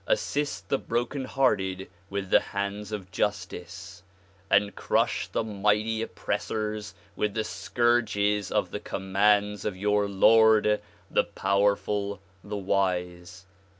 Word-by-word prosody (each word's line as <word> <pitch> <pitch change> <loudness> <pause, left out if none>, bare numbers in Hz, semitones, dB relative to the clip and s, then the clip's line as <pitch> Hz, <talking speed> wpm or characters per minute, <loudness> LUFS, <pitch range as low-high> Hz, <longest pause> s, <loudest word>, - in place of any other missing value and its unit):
assist 150 - -1
the 135 - +1
broken 120 +4 -2
hearted 95 -9 0 0.2
with 100 -1 -3
the - - +7
liands 100 +1 -3
of 95 -3 -6
justice 95 -1 -4 0.5
and 100 0 +3
crush - - 0
the - - -1
mighty 105 +1 0
oppressors 105 -2 -3 0.2
with 105 - 0
the 110 - 0
scourges 105 -4 +1
of - - 0
the - - -4
commands 105 +1 +1
of 105 -3 -3
your 105 +1 +1
Lord, 105 +1 +5 0.3
the - - +3
powerful, 100 0 0 0.2
the 105 0 -5
wise." 90 -2 -2
105 Hz, 115 wpm, -27 LUFS, 95-110 Hz, 0.5 s, the